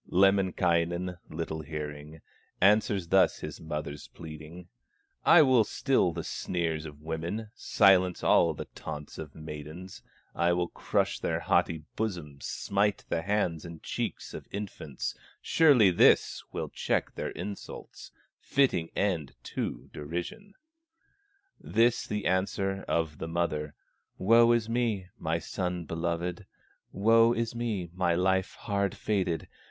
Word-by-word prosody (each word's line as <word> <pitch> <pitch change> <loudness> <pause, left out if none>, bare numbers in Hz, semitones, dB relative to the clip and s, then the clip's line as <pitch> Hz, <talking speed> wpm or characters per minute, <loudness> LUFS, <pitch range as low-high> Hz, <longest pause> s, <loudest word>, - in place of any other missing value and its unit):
Lemminkainen, 90 -2 +2
little 80 0 -4
hearing, 75 0 -7 0.4
Answers 100 -2 +3
thus 95 -1 +4
his - - -7
mother's 75 -3 -5
pleading: 80 +2 -10 0.6
"I 165 -1 +8
will 130 -5 +5
still 115 -3 +1
the 85 0 -5
sneers 80 -3 -2
of 75 0 -13
women, 85 +7 -4
Silence 95 -7 +3
all 80 -2 +4
the - - -6
taunts 75 0 -7
of 75 -2 -8
maidens, 80 +4 -8 0.3
I 85 +1 +2
will 85 0 0
crush - - -1
their - - -1
haughty 80 -2 +1
bosoms, 85 -10 -4
Smite 100 0 0
the 85 - 0
hands 90 -4 0
and 85 -2 -10
cheeks - - -4
of - - -8
infants; 95 -8 -5 0.3
Surely 135 - +5
this 85 - +4
will - - -4
check - - -1
their - - -3
insults, 100 -1 -8 0.3
Fitting 110 -12 +1
ending 85 -9 -1
to - - -4
derision!" 90 - -6 1.0
This 115 +2 +2
the 105 -1 -3
answer 95 +1 0
of 80 -3 -1
the 80 - -4
mother: 80 -3 -2 0.4
"Woe 115 +4 +6
is 120 -2 +2
me, 115 -6 -1
my 80 0 0
son 90 0 -3
beloved! 85 +3 -3 0.4
Woe 115 +3 +5
is 115 0 -2
me, 110 -8 -3
my 90 -2 +1
life 95 +1 +1
hard 100 -3 -1
fated! 95 -6 -1
90 Hz, 125 wpm, -29 LUFS, 80-105 Hz, 1.0 s, I